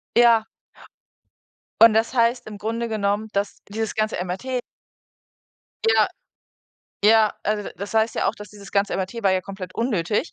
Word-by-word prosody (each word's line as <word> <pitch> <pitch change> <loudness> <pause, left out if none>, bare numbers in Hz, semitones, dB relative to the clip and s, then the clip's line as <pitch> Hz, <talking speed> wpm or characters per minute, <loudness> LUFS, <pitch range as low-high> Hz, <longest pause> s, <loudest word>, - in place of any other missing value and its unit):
Ja. 235 -2 +5 1.3
Und 230 -1 +9
das 225 +3 +1
heißt 240 +1 +2
im 210 -1 -8
Grunde 230 +3 -3
genommen, 210 0 -1
dass 200 0 -2
dieses 220 +2 -3
ganze 215 0 -1
MRT 250 +8 -3 1.3
Ja, - - +4 1.0
ja, 220 -1 +5
also, 210 0 -1
d - - -11
das 200 +2 -7
heißt 220 +1 +2
ja - - 0
auch, - - 0
dass 210 0 -11
dieses 200 -2 -13
ganze 200 0 +1
MRT 195 +5 -4
war 195 - +4
ja 185 - +1
komplett 190 -2 -8
unnötig, 215 - -1
215 Hz, 155 wpm, -23 LUFS, 200-230 Hz, 1.3 s, Und